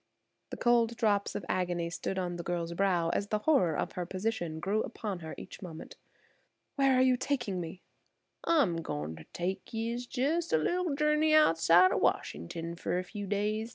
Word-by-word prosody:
The - - -6
cold 235 -1 +3
drops 205 -3 +1
of 185 - -4
agony 175 -2 -1
stood 190 +2 -3
on 175 -2 -2
the 170 - -5
girl's 170 -1 -2
brow 175 -2 +1
as 200 +4 -1
the 215 - 0
horror 200 - +2
of - - -2
her 180 - -3
position 185 -5 -2
grew 205 +5 0
upon 210 -4 -4
her 160 -2 -7
each - - -10
moment. 165 -4 -9 0.8
"Where 275 -2 +4
are 255 - +5
you 255 -1 +4
taking 240 -8 -2
me?" 170 +2 -8 0.6
"I'm 275 - +3
goin' 80 - -4
ter 80 -1 -12
take 180 +2 -4
yer 230 +2 -2
jes' 305 +6 0
a - - +4
little 345 - 0
journey 300 +1 +3
outside 175 - +6
o' - - +1
Washington 165 - -1
fer 175 - -2
a 180 - -1
few 205 +2 -7
days. 210 +3 -1
195 Hz, 185 wpm, -31 LUFS, 170-240 Hz, 0.8 s, outside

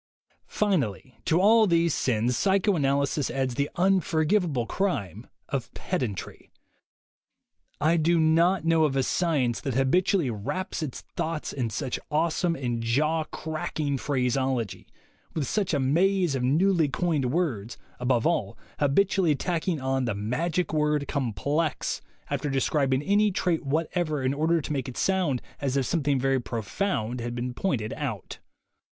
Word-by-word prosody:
Finally, 135 - -1
to 165 - +3
all 220 +3 +6
these 170 -3 +3
sins, 120 0 +1
psychoanalysis 150 - +1
adds 130 -2 -1
the 140 +4 -1
unforgivable 175 - +2
crime 110 - -2 0.2
of 125 -4 -3
pedantry. 125 - -4 1.3
I 165 +2 +3
do 165 +1 +3
not 165 +2 +3
know 165 -1 +4
of 140 -3 0
a 135 - +2
science 140 -8 0
that 135 -4 -3
habitually 160 - +2
wraps 140 - -4
its 145 -5 -5
thoughts 160 -1 -3
in 125 -4 -2
such 130 +3 -3
awesome 165 +2 +1
and 120 -4 -2
jawcracking 155 +2 -1
phraseology, 130 -4 -1 0.5
with 155 -4 0
such 200 -3 0
a 145 - +1
maze 175 +5 +2
of 135 - -1
newly 160 +5 +3
coined 150 -1 0
words, 130 - -1 0.2
above 125 -2 +1
all, 105 - 0 0.2
habitually 170 +2 +3
tacking 170 +1 -1
on 130 0 0
the 115 -4 -1
magic 155 - -1
word 150 -1 +1
"complex" 140 +4 -1 0.3
after 145 - -2
de 135 - -1
scribing 135 0 +1
any 205 +1 +4
trait 180 -4 0
whatever 155 0 -1
in 130 +1 +1
order 160 +3 +1
to 150 - -4
make 135 -2 -2
it 125 - -9
sound 180 -10 +1 0.2
as 140 -1 -1
if 135 - +1
something 145 -4 +1
very 135 0 +1
profound 120 - -2
had 120 +1 -4
been 125 +1 -3
pointed 120 - -1
out. 130 - -5
145 Hz, 140 wpm, -26 LUFS, 130-170 Hz, 1.3 s, all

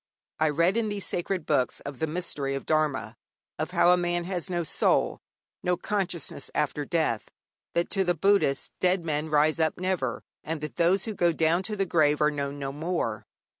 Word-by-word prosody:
I 155 0 +3
read 170 +7 +2
in 225 -2 +1
these 205 -1 -3
sacred 175 -1 -2
books 135 -4 +1
of 140 -2 -7
the 160 - 0
mystery 150 -4 -3
of 135 - -5
Dharma, 155 -3 0 0.4
of - - -1
how 175 - +4
a 180 - +5
man 175 0 0
has 180 0 -3
no 175 -1 -1
soul, 155 - +1 0.4
no 180 0 +1
consciousness 180 -9 -2
after 150 -1 0
death; 155 -9 0 0.5
that 170 0 0
to 195 - +2
the 175 -1 +1
Buddhist 195 -6 +2
'dead 180 -1 +2
men 155 0 -1
rise 155 +2 +3
up 160 0 +1
never,' 180 -10 -1 0.2
and 160 0 -3
that 150 -5 -6
those 180 +3 +3
who 220 - -3
go 175 -3 +3
down 165 +2 +2
to 210 +2 -3
the 195 -1 0
grave 150 -4 +3
are 150 0 +3
known 140 -1 -3
no 135 -1 -3
more. 140 - -2
165 Hz, 195 wpm, -27 LUFS, 150-180 Hz, 0.5 s, a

